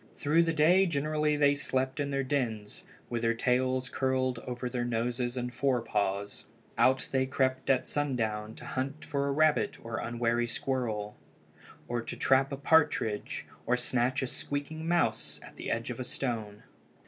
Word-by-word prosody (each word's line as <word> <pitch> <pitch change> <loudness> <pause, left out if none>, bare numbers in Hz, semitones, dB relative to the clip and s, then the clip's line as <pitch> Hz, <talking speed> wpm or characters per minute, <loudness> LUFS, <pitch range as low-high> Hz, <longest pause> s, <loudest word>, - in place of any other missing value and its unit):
Through 155 +3 +3
the 165 -1 +2
day 170 +5 +5
generally 150 -1 +1
they 145 -1 +5
slept 130 -1 -1
in 145 -1 0
their 135 -1 0
dens, 115 -7 -2 0.3
with 120 -1 -2
their 115 0 +2
tails 130 +2 +1
curled 130 -2 0
over 125 +1 -4
their 125 -1 -2
noses 120 +1 -1
and 125 0 -3
fore 135 -3 +1
paws. 100 -1 -2 0.3
Out 130 0 +3
they 130 -1 +2
crept 130 0 0
at 130 -2 +3
sundown 110 -7 -1
to - - -11
hunt 140 +4 -3
for 140 -1 -1
a - - +1
rabbit 155 +1 +2
or 115 -1 -3
unwary 120 0 0
squirrel, 115 -4 -2 0.7
to 120 -1 -3
trap 135 +1 +3
a 140 - -3
partridge, 145 -8 +2 0.2
or 125 +1 +3
snatch 125 +2 0
a - - +1
squeaking 145 +5 -4
mouse 165 -11 +1
at - - -13
the - - -5
edge 115 +2 -1
of 120 - -7
a - - -2
stone. 110 -6 -4
130 Hz, 165 wpm, -30 LUFS, 120-140 Hz, 0.7 s, day